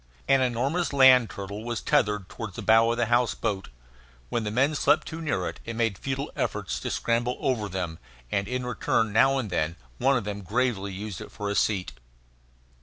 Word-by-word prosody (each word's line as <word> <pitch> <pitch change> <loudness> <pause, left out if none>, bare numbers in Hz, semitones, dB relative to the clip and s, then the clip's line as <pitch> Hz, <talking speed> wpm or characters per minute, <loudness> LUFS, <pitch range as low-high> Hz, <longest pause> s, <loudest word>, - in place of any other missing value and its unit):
An 135 -1 +4
enormous 135 +8 0
land 130 -4 +7
turtle 100 +2 -6
was 120 -1 -3
tethered 105 -10 +1
toward 110 -4 -7
the - - -6
bow 115 +1 +5
of 120 - -1
the 120 - +2
house 120 +1 +2
boat. 100 -4 -3 0.6
When 115 - -1
the 105 - -2
men 135 +8 +2
slept 150 +1 +3
too 165 +1 -6
near 95 - -1
it, - - -6
it 115 - -6
made 115 -3 +1
futile 135 +6 -4
efforts - - -2
to - - -4
scramble 120 +1 0
over 125 -8 -1
them; 90 -4 -4 0.3
and 100 0 0
in 125 0 -2
return 115 -2 0
now 135 +5 +4
and 115 -7 -3
then 85 -1 0 0.2
one 135 0 +3
of 120 - -2
them 100 0 -5
gravely 100 0 -1
used 100 0 -6
it - - -9
for 100 0 -4
a - - -2
seat. 95 -7 +1
115 Hz, 200 wpm, -26 LUFS, 100-130 Hz, 0.6 s, land